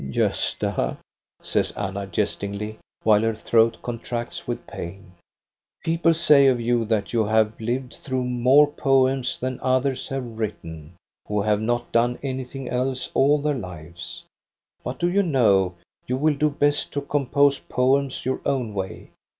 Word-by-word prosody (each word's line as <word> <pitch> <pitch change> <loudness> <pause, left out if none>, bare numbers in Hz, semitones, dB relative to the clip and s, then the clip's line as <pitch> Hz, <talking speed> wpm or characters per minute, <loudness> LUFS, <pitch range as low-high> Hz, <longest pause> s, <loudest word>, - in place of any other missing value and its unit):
"Gosta," - - 0 0.5
says - - 0
Anna, 100 0 -4
jestingly, 105 +1 -3 0.2
while 105 -1 +5
her 115 0 0
throat 115 +1 +3
contracts 120 0 -5
with - - -4
pain, 90 +2 -8 0.7
"people 165 0 +2
say 150 -4 +6
of 130 -2 +3
you 120 0 +1
that 105 -1 -1
you 115 -2 +3
have 110 +1 +1
lived 125 +3 -2
through 130 -1 -3
more 125 +4 +5
poems 135 -2 +1
than 130 0 -3
others 130 +1 0
have 125 -4 -5
written, 80 -7 -5 0.3
who 105 -1 0
have 105 0 +1
not 120 +2 -1
done 120 +1 +2
anything 130 0 -5
else 130 +1 -2
all 140 +2 +4
their 150 +1 0
lives; 85 - -8 0.6
but 125 +1 -4
do 175 - +1
you 190 +3 +3
know, 105 - +3 0.3
you 125 - 0
will 155 +2 +3
do 150 +1 +1
best 145 0 +1
to 145 - -1
compose 140 0 +2
poems 135 +1 0
your 130 - -1
own 130 -6 -1
way. 95 -1 -5
125 Hz, 150 wpm, -24 LUFS, 105-135 Hz, 0.7 s, say